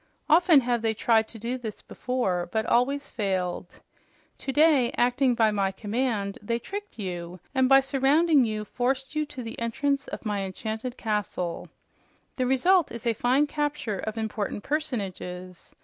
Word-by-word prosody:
Often 325 -2 +6
have 240 -2 0
they 225 -1 0
tried 225 0 +3
to 230 - -11
do 240 +4 -3
this 220 -4 -7
before, 190 -9 -2
but 220 0 0
always 275 +4 +1
failed. 185 -4 -3 0.6
Today, 280 -3 +3
acting 245 +1 +3
by 225 -2 +3
my 195 -2 0
command, 210 0 -2
they 230 +3 -1
tricked 405 - -7
you, 180 -3 -5
and 260 -2 +3
by 270 0 +8
surrounding 280 +3 +3
you 215 -2 -2
forced 260 +5 -2
you 305 -1 0
to 260 -4 -7
the 225 - -7
entrance 275 +5 -1
of - - -7
my 205 -2 -1
enchanted 220 +6 -5
castle. 205 -5 -2 0.7
The 255 -2 +1
result 340 +7 +3
is 235 0 -8
a 230 - +3
fine 255 +6 +2
capture 295 -8 -2
of 220 +1 -4
important 215 -2 -3
personages. 190 - -4
235 Hz, 155 wpm, -26 LUFS, 210-270 Hz, 0.7 s, by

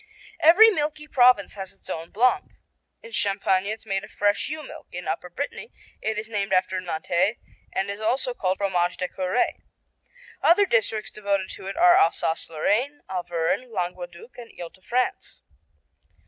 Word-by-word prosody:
Every 395 +8 +8
milky 300 -3 -2
province 250 -7 +4
has 190 -2 -7
its - - -17
own 165 +1 -5
Blanc. 245 +4 +1 0.5
In 470 - -11
Champagne 195 - +1
it's 215 +1 -5
made 195 0 -2
of 205 - -10
fresh 205 +4 +1
ewe 310 0 -5
milk. - - -11
In 180 0 -7
Upper 180 - -3
Brittany 285 - -5 0.3
it 220 0 -2
is 215 0 -4
named 200 -3 -2
after 185 0 +2
Nantes 175 +5 0 0.3
and 195 - -1
also 250 +3 0
called 185 -5 -1
Fromage 180 -3 0
de 180 - -2
Curé. 185 +6 -1 0.8
Other 340 +7 +5
districts 220 - 0
devoted 200 -2 -1
to 190 - -8
it 195 - -5
are 350 0 +7
Alsace 380 - +2
Lorraine, 230 - 0
Auvergne, 175 +5 -1
Languedoc, 180 +2 -6
and 235 -1 -10
Ile 170 -1 -6
de 190 - -23
France. 250 +6 -2
205 Hz, 160 wpm, -25 LUFS, 185-255 Hz, 0.8 s, Every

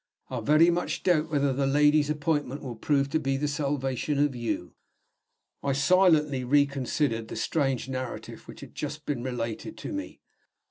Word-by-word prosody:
I 125 - -2
very 155 +8 +5
much 175 +1 -2
doubt 165 -3 +2
whether 140 -3 +1
the 135 +1 0
lady's 150 +1 +4
appointment 145 -2 -1
will 125 -3 -5
prove 140 +4 +1
to 160 - +2
be 135 -1 -1
the 150 +2 -1
salvation 140 -1 -1
of 145 -2 +2
You." 115 -7 -3 0.9
I 140 - 0
silently 150 -3 +3
reconsidered 140 -3 +1
the - - -7
strange 135 -5 0
narrative 130 -2 -6
which - - -11
had - - -11
just 150 +1 -5
been 140 -5 -2
related 120 - -4
to - - -6
me. 295 0 -6
140 Hz, 165 wpm, -27 LUFS, 130-150 Hz, 0.9 s, very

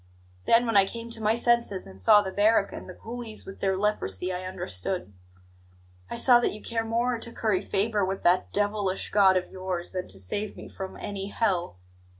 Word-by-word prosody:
"Then, 230 +1 +5
when 230 -2 -1
I 195 -1 +6
came 230 +2 -7
to 230 -1 0
my 215 +1 +2
senses, 235 -5 +2
and 95 0 -9
saw 205 - +6
the 190 - -4
barrack 205 0 +2
and - - -8
the 185 - -9
coolies 230 -2 -7
with 195 - -10
their 190 -1 0
leprosy, 185 - -1
I 180 +1 -5
understood. 180 - -4 1.0
I - - -4
saw 245 -2 +6
that 240 - 0
you 210 - -7
care 225 +1 -2
more 235 +2 0
to 235 - -2
curry 215 -5 0
favour 205 +1 0
with 190 +1 -2
that 180 +1 +2
devilish 205 -2 -1
God 195 -2 +5
of 180 - -3
yours 185 -2 -4
than 185 -1 -4
to - - -2
save 200 - -3
me - - -9
from 190 -1 -7
any 195 -1 -5
hell. 190 - -1
200 Hz, 200 wpm, -27 LUFS, 185-225 Hz, 1.0 s, I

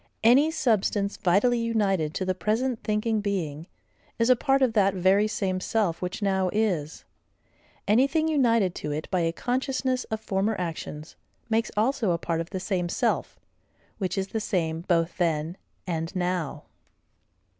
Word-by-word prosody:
Any 260 +7 +6
substance 210 - +1
vitally 205 +7 +3
united 200 -9 0
to 190 - -1
the 185 - +1
present 220 +7 -1
thinking 215 0 0
being 170 -6 -3 0.5
is 230 +2 +3
a - - +7
part 270 +2 +2
of 245 -4 +2
that 200 -3 +3
very 190 +3 +3
same 190 -3 -1
self 190 -3 0
which 180 +3 -4
now 190 -2 +1
is; 185 -9 -1 0.8
anything 275 +9 +3
united 230 - +2
to 150 - -3
it 150 +1 -3
by 185 - +2
a 165 -1 +1
consciousness 255 - -1
of 220 - -4
former 205 +1 -1
actions, 160 -3 -5 0.4
makes 225 +1 +1
also 230 -1 +1
a - - 0
part 165 0 -2
of 165 - -7
the 190 - -4
same 180 -2 -1
self, - - -1 0.6
which 185 -3 -2
is 195 0 -1
the 220 - -2
same 165 -6 -1
both 170 -1 0
then 165 -1 0 0.3
and 165 -2 -3
now. 180 -4 -2
195 Hz, 155 wpm, -26 LUFS, 175-230 Hz, 0.8 s, a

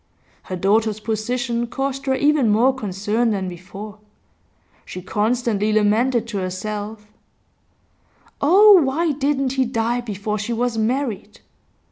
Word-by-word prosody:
Her 185 - -5
daughter's 215 +3 +1
position 235 +2 -2
caused 270 +2 -4
her 265 - +2
even 285 -3 +2
more 235 +6 +3
concern 210 0 -1
than 195 -3 -2
before; 195 +4 -9 0.8
she - - -8
constantly 215 +2 0
lamented 220 +3 +2
to 205 -4 -3
herself: 210 +3 -5 1.4
'Oh, 385 +5 +7
why 305 +4 0
didn't 275 -1 0
he 265 0 +1
die 235 0 -1
before 210 -2 -4
she 215 +4 -3
was 240 0 -1
married! 225 -1 -2
225 Hz, 120 wpm, -21 LUFS, 210-260 Hz, 1.4 s, Oh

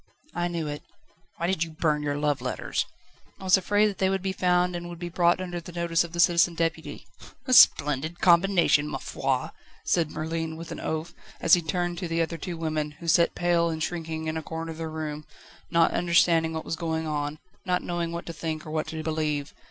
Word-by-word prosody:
"I 175 0 -1
knew 170 -3 -3
it." 145 0 -5 0.6
"Why 170 - -2
did 175 -2 +1
you 165 - -6
burn 155 -1 0
your 145 -1 -1
love 145 -2 0
letters?" 125 - -2 0.5
"I - - -11
was 185 -1 +6
afraid 205 +2 +2
that 205 -2 -2
they 190 - +3
would 190 -1 -1
be 190 - 0
found, 180 -1 +2
and 175 0 -5
would 175 - -8
be 175 +1 -5
brought 175 0 +3
under 175 -2 -4
the 175 - -10
notice 170 -1 +1
of 170 - -8
the 170 - -6
Citizen 170 0 +4
Deputy." 160 -3 -3 0.4
"A 255 - 0
splendid 155 - +5
combination, 170 -4 +4
ma 150 - -3
foi!" 135 -1 -2 0.3
said 165 -3 +2
Merlin, 160 +1 -3
with 165 0 -8
an - - -5
oath, 160 +2 -3 0.3
as 165 - +3
he 175 - +7
turned 175 +1 -2
to 180 - -3
the 165 0 +1
two 180 - -4
other - - -7
women, 155 -2 -2
who 170 - -9
sat 170 +1 +4
pale 175 -1 +2
and 160 -1 -3
shrinking 160 -2 -4
in 160 0 -2
a - - -3
corner 165 +1 -5
of 160 - -9
the 165 - -3
room, 155 -1 -5 0.5
not 170 0 +4
understanding 170 -1 +3
what 160 0 -4
was - - -2
going 160 -1 -2
on, 150 -1 -2 0.3
not 180 0 +1
knowing 175 -1 -2
what 170 0 -5
to 170 - -6
think 160 -1 -4
or 155 - -7
what 155 0 -1
to 160 0 -5
believe. 155 -2 -2
165 Hz, 220 wpm, -26 LUFS, 155-175 Hz, 0.6 s, he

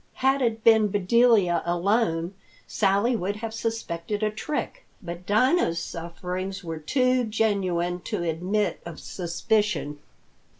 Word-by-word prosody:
Had 270 +1 +2
it 225 -3 0
been 220 -2 +6
Bedelia 205 -1 +3
alone, 175 0 0 0.3
Sally 205 +4 +2
would 200 -1 -2
have 220 +1 -5
suspected 215 -3 -3
a 215 - +1
trick, 300 - -4 0.2
but 175 0 -8
Dinah's 220 - +3
sufferings 180 +3 -5
were 165 -2 -5
too 255 - +2
genuine 190 -6 0
to - - -2
admit 180 +6 -1
of 170 -2 -8
suspicion. 180 -3 -1
200 Hz, 120 wpm, -25 LUFS, 175-225 Hz, 0.3 s, been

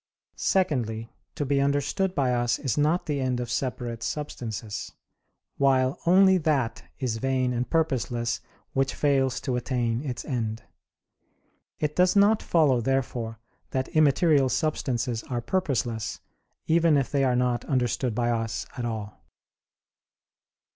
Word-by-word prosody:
Secondly, 120 - 0 0.2
to 145 - -2
be 140 0 +2
understood 145 +7 0
by 130 -3 +2
us 120 0 +1
is 135 -5 -2
not 155 +4 +2
the 145 -3 -1
end 130 -1 0
of 120 -1 -4
separate 120 -3 -3
substances: 115 -7 -5 0.6
while 135 -1 +2
only 190 +1 +6
that 145 -7 0 0.2
is 125 -5 -2
vain 130 +1 0
and 120 +1 -2
purposeless, 125 -7 0 0.3
which 135 0 0
fails 135 -3 +1
to 130 - -1
attain 120 -1 -1
its 130 -4 -5
end. 110 -4 -3 1.2
It 150 -1 -1
does 180 +1 +4
not 205 +2 +5
follow, 145 -8 +3
therefore, 120 -3 -1 0.3
that 130 0 -2
immaterial 150 -2 +4
substances 125 -6 -1
are 125 -2 -1
purposeless, 120 - -1 0.5
even 165 -2 +4
if 135 - -1
they 140 -1 +2
are 125 -2 +2
not 125 -1 +1
understood 125 -2 0
by 120 0 +1
us 115 -1 -2
at 125 -3 -3
all. 110 -3 -5
130 Hz, 135 wpm, -26 LUFS, 120-145 Hz, 1.2 s, only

